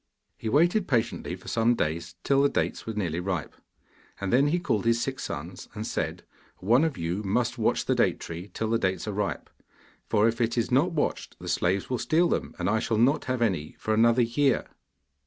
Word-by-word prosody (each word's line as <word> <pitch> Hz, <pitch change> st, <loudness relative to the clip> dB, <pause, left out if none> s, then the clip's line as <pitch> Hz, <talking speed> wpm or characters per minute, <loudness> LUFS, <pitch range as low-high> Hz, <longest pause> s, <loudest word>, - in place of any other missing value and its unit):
He 110 Hz, -, -4 dB
waited 175 Hz, -, +3 dB
patiently 120 Hz, -5 st, -1 dB
for -, -, -15 dB
some 115 Hz, +1 st, +2 dB
days 85 Hz, -1 st, -2 dB
till 140 Hz, 0 st, +3 dB
the 140 Hz, -, +4 dB
dates -, -, -2 dB
were 110 Hz, -, -2 dB
nearly 90 Hz, -5 st, -1 dB
ripe, 90 Hz, -5 st, -3 dB, 0.7 s
and 100 Hz, +1 st, -2 dB
then 135 Hz, +3 st, +5 dB
he 165 Hz, +4 st, +2 dB
called 110 Hz, -, 0 dB
his 115 Hz, 0 st, +2 dB
six 130 Hz, +1 st, -3 dB
sons, -, -, -6 dB
and -, -, -4 dB
said: -, -, -3 dB, 0.3 s
'One 120 Hz, -, +3 dB
of 160 Hz, -5 st, -1 dB
you 85 Hz, +4 st, -2 dB
must 120 Hz, +5 st, 0 dB
watch 110 Hz, -, +1 dB
the -, -, +2 dB
date -, -, +2 dB
tree 85 Hz, +4 st, -7 dB
till 110 Hz, +4 st, -2 dB
the 115 Hz, -, +2 dB
dates 95 Hz, 0 st, -1 dB
are -, -, -1 dB
ripe, 100 Hz, 0 st, -2 dB, 0.6 s
for 105 Hz, +2 st, +4 dB
if 115 Hz, +1 st, -1 dB
it 115 Hz, +1 st, 0 dB
is 115 Hz, -, 0 dB
not 150 Hz, +8 st, +3 dB
watched 155 Hz, -, -2 dB
the -, -, -10 dB
slaves 95 Hz, +2 st, 0 dB
will 125 Hz, -2 st, -2 dB
steal 170 Hz, +2 st, +2 dB
them, -, -, -2 dB
and 90 Hz, -, -2 dB
I 110 Hz, +2 st, +2 dB
shall 110 Hz, 0 st, -1 dB
not 130 Hz, +7 st, +3 dB
have 130 Hz, -2 st, 0 dB
any 90 Hz, -9 st, -1 dB
for 110 Hz, -, -1 dB
another 115 Hz, +2 st, +4 dB
year. 130 Hz, +3 st, +1 dB
115 Hz, 210 wpm, -27 LUFS, 100-130 Hz, 0.7 s, then